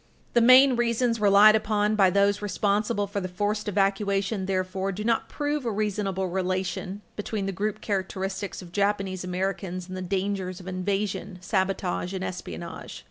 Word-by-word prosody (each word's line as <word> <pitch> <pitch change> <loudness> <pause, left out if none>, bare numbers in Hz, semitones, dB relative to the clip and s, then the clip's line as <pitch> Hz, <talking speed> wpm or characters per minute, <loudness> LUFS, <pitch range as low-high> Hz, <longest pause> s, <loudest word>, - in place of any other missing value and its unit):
The 240 - +4
main 255 +2 +7
reasons 235 -1 +1
relied 205 +1 +7
upon 210 0 +1
by 195 -3 +5
those 200 +2 +2
responsible 205 +1 0
for 200 0 -4
the 185 - -3
forced 205 +4 -2
evacuation, 195 0 0
therefore, 190 0 -1
do 200 +3 -5
not 230 0 0
prove 295 -1 -2
a 235 - -1
reasonable 200 -2 -1
relation 185 +2 -2
between 205 -1 -3
the 195 - -1
group 205 +3 -3
characteristics 190 -1 -3
of 175 - -12
Japanese 195 -1 0
Americans 185 0 -3
and 185 - -7
the 185 - -4
dangers 190 0 -2
of 185 - -11
invasion, 195 +1 -2
sabotage 190 -1 -1
and 185 - -3
espionage. 175 -2 -6
195 Hz, 155 wpm, -26 LUFS, 185-210 Hz, -, main